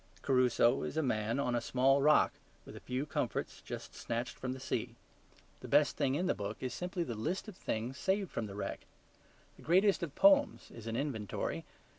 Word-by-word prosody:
Crusoe 125 -1 +3
is - - -4
a 160 - +2
man 115 -1 0
on 125 -3 0
a 120 - +1
small 135 +3 +3
rock 150 +2 +5 0.3
with - - -10
a - - -8
few 130 +3 -3
comforts 150 - -3
just - - -7
snatched 115 0 -3
from 130 - -4
the 130 - -8
sea: 130 - -3 0.6
the - - -9
best - - +4
thing 135 0 +1
in 175 +5 0
the - - +2
book 105 0 -5
is 130 -2 -3
simply 180 0 -3
the 120 - -4
list 160 - -3
of 210 - -8
things 125 -4 -3
saved 190 -1 0
from 110 - -3
the 100 - -8
wreck. 105 - -5 0.7
The - - -15
greatest 190 +5 +3
of 165 -5 -4
poems 290 -1 +4
is 115 -1 -10
an 115 - -2
inventory. 120 -7 -3
130 Hz, 200 wpm, -33 LUFS, 115-165 Hz, 0.7 s, rock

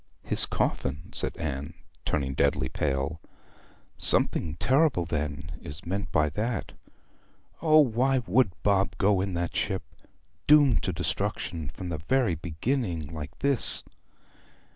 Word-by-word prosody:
'His - - +4
coffin!' 75 +4 -2
said - - -2
Anne, 75 0 -4 0.3
turning 65 -2 0
deadly 65 -1 +1
pale. 70 +3 -1 0.8
'Something 80 -2 0
terrible, 130 - +3
then, 75 -1 -3
is 75 +4 -8
meant 95 -2 -3
by 75 -1 +3
that! 115 +5 -2 0.9
O, 155 -1 +5
why 130 +1 +2
would 115 +3 +4
Bob 100 -2 +2
go 100 0 +3
in 95 -2 -2
that 85 0 -2
ship? - - -1 0.6
doomed 145 -6 +6
to - - -1
destruction 80 -4 -2
from 90 +3 -7
the 80 -3 -3
very 120 - +2
beginning 85 - -2
like 75 -2 -7
this!' 140 -4 +1
85 Hz, 125 wpm, -28 LUFS, 75-115 Hz, 0.9 s, doomed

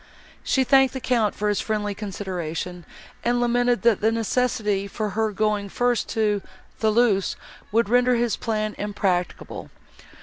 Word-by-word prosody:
She 265 - +2
thanked 270 0 +4
the - - -2
Count 235 -5 +1
for 210 - -1
his 205 -1 +1
friendly 210 -2 -2
consideration, 180 -4 -5 0.4
and 240 +1 +1
lamented, 245 -2 +2
that 230 -4 +3
the 220 +1 +3
necessity 225 -3 0
for 210 +1 -3
her 220 +1 0
going 210 0 0
first 245 +2 0
to 210 -2 +1 0.4
Thoulouse 220 -3 +2 0.4
would 230 0 +2
render 245 +2 +3
this 235 -1 +1
plan 215 -2 -2
impracticable. 195 -3 -2
215 Hz, 140 wpm, -24 LUFS, 205-240 Hz, 0.4 s, thanked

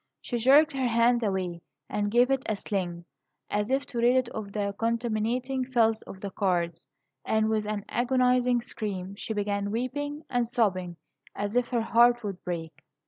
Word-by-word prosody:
She 245 - -3
jerked 280 +6 +6
her 265 -2 0
hand 235 +1 +3
away, 185 -5 -2 0.3
and 205 0 -1
gave 245 +4 +4
it 270 -1 +2
a 215 - +1
sling 180 -4 -3 0.5
as 210 +2 0
if 270 +1 +1
to 240 - -5
rid 240 +2 +4
it 255 -2 +2
of 210 -4 -6
the 200 -1 -2
contaminating 235 +3 0
filth 230 -4 +2
of 190 - -10
the 200 - -5
cards; 175 -4 -1 0.4
and, 220 0 +1
with 215 -1 0
an 210 -1 -3
agonizing 250 0 +2
scream, 195 -5 -5
she 215 +2 -5
began 200 -1 -1
weeping 290 +7 -3
and 245 -1 0
sobbing 185 -8 0 0.4
as 205 +2 -3
if 245 -1 +2
her 240 -2 +1
heart 240 +1 +4
would 195 -3 -5
break. 165 -3 -5
225 Hz, 175 wpm, -28 LUFS, 200-245 Hz, 0.5 s, jerked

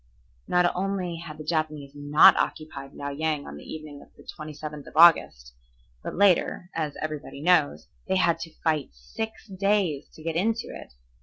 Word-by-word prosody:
Not 180 0 +2
only 185 -2 -2
had 160 -2 -9
the 155 - -8
Japanese 155 -3 -2
not 145 +1 +6
occupied 140 -3 -4
Liao 140 - -5
Yang 150 0 -2
on 70 - -8
the - - -11
evening 155 -2 -8
of - - -16
the - - -17
27th 150 -1 -8
of - - -11
August, 65 - +5 0.5
but - - -6
later, 185 -1 +2
as 155 -3 -3
everybody 155 -2 -5
knows, 160 -2 +2 0.2
they 190 - +1
had 170 -3 +2
to 165 -1 -8
fight 155 -4 +1
six 220 - -7
days 195 -6 0
to 155 - -14
get 165 0 -3
into 225 +6 0
it. - - -10
155 Hz, 170 wpm, -26 LUFS, 145-180 Hz, 0.5 s, not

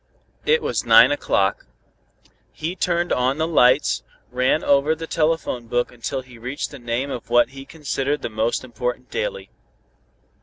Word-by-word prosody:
It 470 +1 +3
was - - -1
nine - - +7
o'clock. - - 0 0.8
He 165 +3 -4
turned 175 -1 0
on 130 +2 +1
the 160 - +1
lights, 130 -4 +3 0.3
ran 125 +4 +1
over 140 +3 +3
the 165 +1 -6
telephone 155 -7 -1
book 120 +1 0
until 120 +3 -4
he 125 -2 -15
reached 130 +5 -4
the 140 - -10
name 120 +3 -2
of 120 -3 -6
what 120 0 +4
he 135 +1 -10
considered 145 -2 -2
the - - -1
most 110 +2 -1
important 125 0 -4
daily. 480 0 -4
135 Hz, 155 wpm, -22 LUFS, 125-160 Hz, 0.8 s, nine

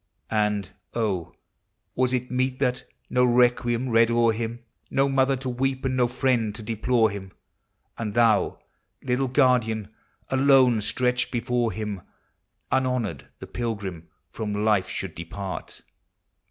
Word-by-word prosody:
And, 105 -3 +1 0.2
(), - - -47 1.0
was 130 0 +1
it 125 -1 -2
meet 130 +1 0
that— 125 0 0 0.2
no 125 - +2
requiem 120 0 +3
read 115 0 +5
oVr 115 -1 +3
him, 115 +1 -4 0.3
No 135 +1 +2
mother 135 0 +2
to 130 0 -5
weep, 130 +2 -1
and 130 -1 0
no 125 -1 +3
friend 120 -4 0
to 110 - -5
deplore 115 +1 +1
him. 95 -2 -8 0.7
And 105 -3 -3
thou, 115 -3 +3 0.5
little 130 +1 0
guardian, 125 -5 +2 0.4
alone 130 -3 +5
Btretched 125 +3 0
before 120 -1 0
him 105 -3 -4 0.3
— - - -45
Unhonored 125 - 0
the - - -9
Pilgrim 100 -8 -4 0.2
from 105 -1 -3
life 105 -4 +2
should 95 -4 -4
depart 95 +3 -7
120 Hz, 135 wpm, -25 LUFS, 105-125 Hz, 1.0 s, read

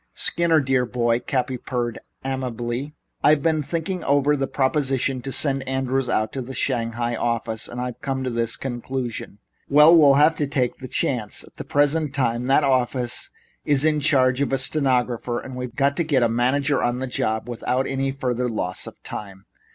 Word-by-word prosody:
"Skinner, 170 -2 +2
dear 135 -2 +1
boy," 120 -1 +1
Cappy 130 0 -2
purred 120 -2 -3 0.3
amiably, 130 +1 -3 0.3
"I've 150 -1 +4
been 160 -2 +2
thinking 170 +4 -3
over 145 +1 +3
the 135 -1 -1
proposition 135 -2 0
to 135 - -5
send 135 -1 +1
Andrews 130 -1 -1
out 110 -2 0
to 135 - -3
the 130 +1 -7
Shanghai 120 -2 -1
office, 115 -1 -2
and 120 - -7
I've 125 -1 -5
come 135 -1 -2
to 130 - -2
this 115 -1 -1
conclusion. 120 -4 -5 0.3
We'll 150 -1 +7
have 150 +3 +5
to 145 - 0
take 130 -3 -1
a 130 - -6
chance. 115 -4 -1
At - - -19
the - - -6
present 145 0 +1
time 125 -3 0
that 135 +3 +3
office 125 -2 +1 0.3
is 145 0 +2
in 155 -1 +3
charge 130 -3 +2
of 140 - 0
a 135 - +2
stenographer, 125 -4 0
and 130 - -8
we've 125 -1 -6
got 140 0 +2
to 170 - +2
get 145 -6 +2
a - - +4
manager 130 +5 +1
on 120 0 0
the 130 - -3
job 110 -3 -2
without 125 +2 -1 0.3
further 125 -1 -1
loss 90 -5 -3
of - - -12
time. 100 -2 -8
130 Hz, 180 wpm, -23 LUFS, 120-140 Hz, 0.3 s, We'll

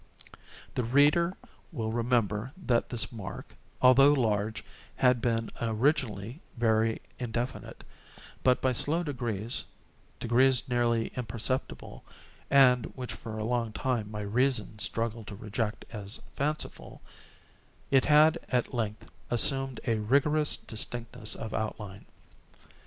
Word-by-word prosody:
The 125 - -1
reader 145 +9 +3 0.3
will 115 -8 -3
remember 115 -1 0
that 125 -10 0
this 120 -2 -1
mark, 105 -5 -8 0.3
although 135 +3 +7
large, 110 -4 0 0.3
had 125 -2 +3
been 115 -1 0
originally 115 - 0 0.2
very 115 -1 +2 0.2
indefinite; 120 +1 -4 0.6
but, 125 -1 +3
by 130 - +3
slow 155 +7 +2
degrees—degrees 120 - -1
nearly 120 -2 +1
imperceptible, 120 +2 -3 0.5
and 125 -3 +5
which 125 -2 -5
for 110 -2 -7
a 110 - -3
long 115 -2 -1
time 120 -3 -1
my 105 0 -5
reason 110 0 0
struggled 115 0 -1
to 100 - -7
reject 110 +2 -3
as 105 +1 -5 0.2
fanciful—it 140 -2 -4
had, 155 +2 +5
at 125 +2 0
length, 110 -3 -3 0.2
assumed 135 +2 +2
a 115 -3 +1
rigorous 145 +7 +2
distinctness 115 -1 -2
of 110 -1 -6
outline. 105 -2 -5
120 Hz, 110 wpm, -29 LUFS, 110-130 Hz, 0.6 s, although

